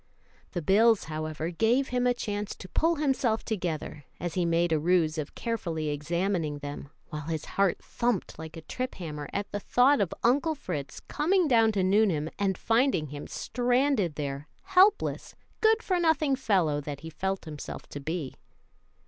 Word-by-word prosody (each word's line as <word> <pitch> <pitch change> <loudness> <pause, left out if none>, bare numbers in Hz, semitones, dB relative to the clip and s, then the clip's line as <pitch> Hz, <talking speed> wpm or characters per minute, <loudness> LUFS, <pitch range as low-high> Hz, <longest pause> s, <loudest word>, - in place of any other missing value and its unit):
The 175 - -3
bills, 220 +5 +4
however, 155 +1 -4
gave 235 +9 +2
him 250 0 +1
a 245 - +4
chance 210 -3 -3
to 185 - -10
pull 330 - +2
himself 265 -6 0
together, 165 - -3
as 175 0 -3
he 180 -2 +1
made 170 0 +2
a 160 - +3
ruse 160 -1 +2
of 150 - -5
carefully 170 -10 -2
examining 165 +1 -1
them, 145 -1 -7 0.2
while 150 0 -6
his 160 -2 -3
heart 195 -2 0
thumped 235 -9 -2
like 160 +1 -8
a - - -7
trip 255 +10 -4
hammer 150 -5 -6
at 200 0 -3
the 205 - -2
thought 255 +6 +4
of 190 - 0
Uncle 290 +6 +3
Fritz 145 - -5
coming 355 +3 +1
down 225 -4 +5
to 195 -2 +1
Nuneham 185 -6 +2
and 195 -2 +1
finding 225 - +2
him 145 +1 -7
stranded 245 - +1
there, 140 0 -4 0.2
helpless, 385 +1 +3 0.2
good 445 +1 +4
for 365 -2 +1
nothing 310 -4 +3
fellow 180 - +1
that 145 -1 -6
he 160 +1 -8
felt 190 +4 -3
himself 150 -2 -7
to 145 - -6
be. 155 -1 -4
190 Hz, 170 wpm, -28 LUFS, 155-245 Hz, 0.2 s, down